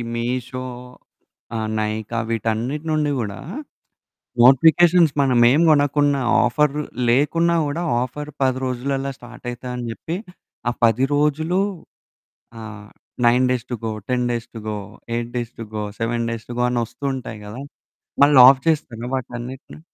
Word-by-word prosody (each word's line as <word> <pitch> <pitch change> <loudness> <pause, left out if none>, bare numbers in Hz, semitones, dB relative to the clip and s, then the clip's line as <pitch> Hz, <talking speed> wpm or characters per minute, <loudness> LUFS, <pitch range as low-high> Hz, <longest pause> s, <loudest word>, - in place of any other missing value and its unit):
మీషో 125 +2 -3 0.9
ఆహ్, 110 -1 -2
నైకా 110 +1 -3
వీటన్నిటి 115 +7 -2
నుండి 150 -1 +1
గూడా 100 -4 -4 1.0
నోటిఫికేషన్స్ 160 +5 +6
మనమేం 125 +2 +4
గొనకున్నా, 145 -1 +3 0.2
ఆఫర్ 140 +4 +2 0.4
లేకున్నా 165 +7 +2
గూడా, 145 +4 -2 0.2
ఆఫర్ 145 +4 -5
10 130 -1 +2
రోజులల్లా 135 +2 -2
స్టార్టయితా 120 0 -8
అని 125 - -5
జెప్పి, 160 +9 -5 0.5
ఆ - - +1
10 115 +3 +3
రోజులు 150 +5 +1 1.0
ఆహ్, 105 -1 -9 0.4
9 125 +2 +4
days 125 -1 -1
to - - -1
go, 110 - -1 0.2
10 125 -1 +1
days 120 0 -3
to 115 - -6
go, 105 -1 -2 0.4
8 120 0 -3
days 120 -1 -3
to 115 - -6
go, 105 - -2 0.2
7 115 +1 -1
days 115 -1 -6
to - - -4
go - - +3
అనొస్తూ 120 +2 -3
ఉంటాయి 115 -4 -7
గదా! 105 +6 -8 0.6
మళ్ళాఫ్ 135 -2 +7
జేస్తారా 125 -7 -1
వాటన్నిటిని? 125 +2 -7
125 Hz, 130 wpm, -21 LUFS, 115-145 Hz, 1.0 s, మళ్ళాఫ్